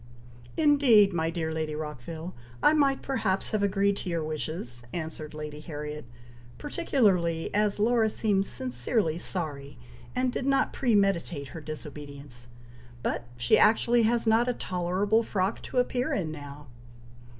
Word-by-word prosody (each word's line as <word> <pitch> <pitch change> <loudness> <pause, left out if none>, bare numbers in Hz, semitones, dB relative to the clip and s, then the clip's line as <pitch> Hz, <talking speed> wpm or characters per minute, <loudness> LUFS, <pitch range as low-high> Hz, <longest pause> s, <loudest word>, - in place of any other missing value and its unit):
"Indeed, 270 - +5
my 165 -1 0
dear 165 -1 -2
Lady 155 -1 -2
Rockville! 155 +3 -6 0.3
I 300 - +6
might 280 -3 +2
perhaps 225 -8 -1
have 215 - 0
agreed 200 0 +2
to - - -5
your 165 -2 -1
wishes," 155 -5 -4
answered 155 -1 -6
Lady 150 -1 -6
Harriet, 150 -2 -6 0.5
"particularly 195 - +1
as 210 -1 +2
Laura 225 0 +3
seems 200 -3 0
sincerely 225 - 0
sorry, 145 -7 -4 0.4
and 255 0 +1
did 270 - -2
not 275 0 +2
premeditate 195 - +1
her 165 - -8
disobedience; 145 -4 -8 0.6
but 120 - -2
she 120 0 +4
actually 235 +2 +4
has 230 +1 +2
not 225 +2 +3
a - - +1
tolerable 190 +3 0
frock 195 -2 -1
to - - -6
appear 250 0 +1
in 165 -6 -1
now!" 145 -1 -9
180 Hz, 140 wpm, -28 LUFS, 155-225 Hz, 0.6 s, I